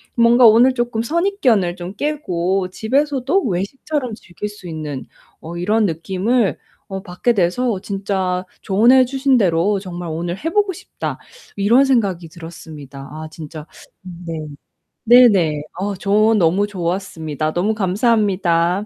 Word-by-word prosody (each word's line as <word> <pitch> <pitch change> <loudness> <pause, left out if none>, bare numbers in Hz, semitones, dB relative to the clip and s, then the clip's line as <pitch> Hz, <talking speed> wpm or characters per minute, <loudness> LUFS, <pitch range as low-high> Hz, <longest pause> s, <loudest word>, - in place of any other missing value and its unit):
뭔가 235 +1 +6
오늘 235 +4 +6
쪼끔 240 -2 -1
선입견을 255 - +1
좀 180 +1 -7
깨고 190 - -1
집에서도 275 - 0
외식처럼 245 - -3
즐길 190 0 -7
수 205 -4 -10
있는 150 -4 -5 0.4
어 170 +2 -7
이런 210 +5 +1
느낌을 190 +6 0 0.3
어 195 -2 -5
받게 205 +5 0
돼서 200 +2 0
진짜 190 -2 -2 0.2
조언해 235 +7 +5
주신 270 +1 +1
대로 195 0 +2
정말 175 -2 -7
오늘 170 +3 -3
'해 320 - -3
보고 410 +2 +1
싶다.' 380 +1 -6 0.4
이런 225 +7 +4
생각이 200 -11 0
들었습니다. 155 -5 -11
아 155 +1 -7
진짜 155 -1 -9 0.3
네. 175 -2 -8 0.7
네 245 +1 +8
네. 165 -9 +1 0.2
어 200 +1 -2
저 210 +3 +2
너무 190 +1 +2
좋았습니다. 170 -5 -3
너무 195 +5 0
감사합니다. 190 -3 +1
195 Hz, 275 characters per minute, -19 LUFS, 175-235 Hz, 0.7 s, 네